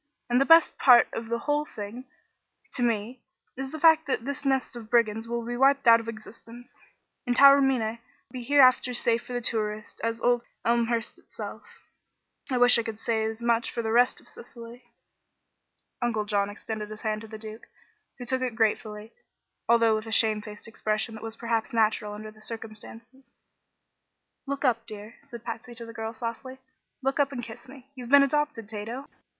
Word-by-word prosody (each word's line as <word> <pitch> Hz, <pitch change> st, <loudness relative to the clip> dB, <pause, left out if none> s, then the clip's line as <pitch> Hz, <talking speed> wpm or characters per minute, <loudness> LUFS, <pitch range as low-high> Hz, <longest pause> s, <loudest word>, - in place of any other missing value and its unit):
"And 245 Hz, +2 st, +4 dB
the -, -, +4 dB
best 330 Hz, +1 st, +5 dB
part 245 Hz, -3 st, +7 dB
of 225 Hz, 0 st, -5 dB
the 235 Hz, -, 0 dB
whole 295 Hz, +4 st, 0 dB
thing, 225 Hz, -1 st, -8 dB, 0.7 s
to -, -, -3 dB
me, 235 Hz, +1 st, -1 dB, 0.3 s
is 265 Hz, +1 st, -5 dB
the 315 Hz, -, -6 dB
fact 320 Hz, 0 st, +5 dB
that 245 Hz, -4 st, -2 dB
this 280 Hz, 0 st, -4 dB
nest 265 Hz, -2 st, 0 dB
of 225 Hz, -2 st, -9 dB
brigands 225 Hz, -1 st, +1 dB
will 235 Hz, 0 st, -3 dB
be 240 Hz, +1 st, -4 dB
wiped 275 Hz, +1 st, +3 dB
out 230 Hz, 0 st, +8 dB
of 230 Hz, -, -9 dB
existence, 230 Hz, +2 st, -11 dB, 0.5 s
and 245 Hz, -, +1 dB
Taormina 270 Hz, -5 st, +5 dB, 0.3 s
be 255 Hz, -, -6 dB
hereafter 255 Hz, 0 st, +5 dB
as 245 Hz, -, -3 dB
safe 235 Hz, 0 st, 0 dB
for 245 Hz, -1 st, -3 dB
tourists 215 Hz, -2 st, -3 dB
as 230 Hz, 0 st, -2 dB
old 245 Hz, +1 st, +2 dB, 0.2 s
Elmhurst 235 Hz, -1 st, 0 dB
itself. -, -, -9 dB, 0.9 s
I 255 Hz, -, 0 dB
wish 245 Hz, -1 st, +6 dB
I -, -, +2 dB
could 225 Hz, -2 st, -6 dB
say 225 Hz, -1 st, -1 dB
as 220 Hz, +1 st, -4 dB
much 235 Hz, 0 st, +1 dB
for 235 Hz, -, -4 dB
the 220 Hz, -, -2 dB
rest 245 Hz, +2 st, +3 dB
of -, -, -20 dB
Sicily." 240 Hz, -, -12 dB, 1.2 s
Uncle 220 Hz, -3 st, -1 dB
John 205 Hz, -1 st, 0 dB
extended 210 Hz, 0 st, -6 dB
his 215 Hz, 0 st, -9 dB
hand 215 Hz, -1 st, -2 dB
to 225 Hz, -, -10 dB
the 220 Hz, 0 st, -9 dB
Duke, 215 Hz, +1 st, -10 dB, 0.5 s
who 245 Hz, -, -8 dB
took 260 Hz, +1 st, -1 dB
it 250 Hz, -3 st, -2 dB
gratefully, 215 Hz, -1 st, -1 dB, 0.6 s
although 230 Hz, -1 st, +5 dB
with 215 Hz, +1 st, -3 dB
a -, -, -6 dB
shamefaced 215 Hz, -1 st, 0 dB
expression 215 Hz, 0 st, -2 dB
that 220 Hz, -, -9 dB
was 225 Hz, 0 st, -6 dB
perhaps 230 Hz, -1 st, -2 dB
natural 215 Hz, -2 st, +1 dB
under 215 Hz, +1 st, -8 dB
the 215 Hz, 0 st, -20 dB
circumstances. 225 Hz, +3 st, -10 dB, 1.2 s
"Look 280 Hz, +1 st, -3 dB
up, 230 Hz, -2 st, +1 dB
dear," 215 Hz, +1 st, -10 dB
said 240 Hz, -5 st, -11 dB
Patsy 240 Hz, +1 st, -7 dB
to 230 Hz, 0 st, -7 dB
the 230 Hz, -, -10 dB
girl, 225 Hz, -1 st, -5 dB
softly; 235 Hz, +3 st, -6 dB, 0.5 s
"look 270 Hz, +2 st, 0 dB
up 280 Hz, -1 st, +2 dB
and 245 Hz, -3 st, -5 dB
kiss 235 Hz, +2 st, -10 dB
me. 270 Hz, 0 st, -15 dB
You've 250 Hz, -3 st, -9 dB
been 280 Hz, +1 st, +7 dB
adopted, 295 Hz, -5 st, -1 dB
Tato! 225 Hz, +6 st, -6 dB
235 Hz, 185 wpm, -27 LUFS, 220-255 Hz, 1.2 s, out